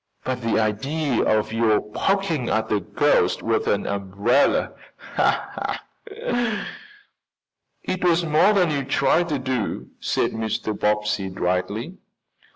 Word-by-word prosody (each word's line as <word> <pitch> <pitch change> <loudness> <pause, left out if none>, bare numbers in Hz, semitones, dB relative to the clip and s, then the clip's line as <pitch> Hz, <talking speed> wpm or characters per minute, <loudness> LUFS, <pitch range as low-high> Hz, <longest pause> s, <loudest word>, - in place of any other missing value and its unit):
"But 130 -1 -3
the 115 -1 +1
idea 125 +6 0
of 110 0 +1
your 115 -2 +3
poking 165 - -1
at 110 0 0
a 105 - +3
ghost 90 - +1
with - - 0
an - - +1
umbrella!" 100 +6 +1 1.4
"It 415 - -6
was 175 -1 +3
more 155 +6 +4
than 180 -5 +3
you 140 -2 -1
tried 170 +5 +2
to 150 - 0
do," 130 -4 -3
said - - 0
Mr. 110 -1 -2
Bobbsey 105 -1 0
dryly. 100 - -2
125 Hz, 115 wpm, -23 LUFS, 105-175 Hz, 1.4 s, more